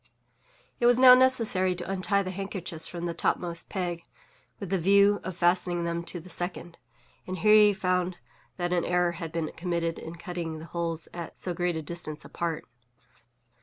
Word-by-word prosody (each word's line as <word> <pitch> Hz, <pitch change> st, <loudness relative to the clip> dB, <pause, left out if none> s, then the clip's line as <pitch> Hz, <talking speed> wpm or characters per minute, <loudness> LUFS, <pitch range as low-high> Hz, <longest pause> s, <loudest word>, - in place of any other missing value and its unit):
It 240 Hz, -, +4 dB
was 245 Hz, 0 st, +5 dB
now 255 Hz, 0 st, +9 dB
necessary 230 Hz, -8 st, +4 dB
to 175 Hz, -, -6 dB
untie 195 Hz, +1 st, +1 dB
the 185 Hz, -, -4 dB
handkerchiefs 185 Hz, -4 st, -4 dB
from 175 Hz, -1 st, -6 dB
the 170 Hz, -, -2 dB
topmost 170 Hz, 0 st, -2 dB
peg, 175 Hz, -3 st, -3 dB, 0.6 s
with 195 Hz, -3 st, -6 dB
the 190 Hz, -, +1 dB
view 200 Hz, +3 st, +4 dB
of 185 Hz, -2 st, -6 dB
fastening 175 Hz, 0 st, +1 dB
them 170 Hz, 0 st, -2 dB
to 175 Hz, -, -1 dB
the 170 Hz, -, -13 dB
second; 175 Hz, -1 st, -5 dB, 0.5 s
and 185 Hz, 0 st, -4 dB
here 210 Hz, +5 st, +4 dB
he 210 Hz, -1 st, +7 dB
found 180 Hz, -2 st, -1 dB, 0.4 s
that 175 Hz, -1 st, -1 dB
an 175 Hz, -2 st, +1 dB
error 180 Hz, 0 st, +1 dB
had 165 Hz, -2 st, -6 dB
been 165 Hz, -1 st, -3 dB
committed 170 Hz, -1 st, -2 dB
in 165 Hz, +1 st, -8 dB
cutting 170 Hz, -3 st, -5 dB
the 155 Hz, -, -9 dB
holes 165 Hz, -1 st, -3 dB
at 170 Hz, -2 st, -7 dB
so 180 Hz, -, -3 dB
great 175 Hz, -1 st, -1 dB
a 160 Hz, -, -4 dB
distance 155 Hz, -1 st, -5 dB
apart. 165 Hz, -2 st, -4 dB
175 Hz, 180 wpm, -27 LUFS, 170-190 Hz, 0.6 s, now